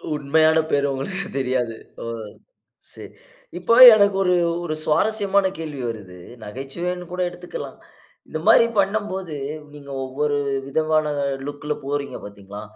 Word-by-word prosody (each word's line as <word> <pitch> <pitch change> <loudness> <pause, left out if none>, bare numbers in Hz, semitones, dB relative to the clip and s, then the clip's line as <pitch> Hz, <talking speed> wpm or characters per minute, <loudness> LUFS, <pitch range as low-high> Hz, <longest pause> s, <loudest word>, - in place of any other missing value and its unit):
உண்மையான 155 +2 +3
பெயர் 145 0 +2
உங்களுக்கு 190 +9 -4
தெரியாது. 125 -3 -1 0.3
ஓ! - - -6 0.9
சரி. - - -10 0.5
இப்போ 230 - +2 0.2
எனக்கு 200 -2 +3
ஒரு 180 -1 +2 0.3
ஒரு 155 -3 -3
சுவாரஸ்யமான 200 +4 +2
கேள்வி 150 -4 -5
வருது. 100 -5 -8 0.3
நகைச்சுவைன்னு 170 +11 -5
கூட 180 0 -3
எடுத்துக்கலாம். 175 0 -8 0.5
இந்த - - -5
மாரி 230 - +7
பண்ணும்போது 195 -4 -1 0.4
நீங்க 140 -1 -11
ஒவ்வொரு 145 +3 -1 0.3
விதமான 155 +2 +1 0.4
லுக்‌ல 145 +1 -4
போறீங்க 140 0 -3
பார்த்தீங்களா. 100 0 -10
150 Hz, 120 wpm, -22 LUFS, 135-180 Hz, 0.9 s, மாரி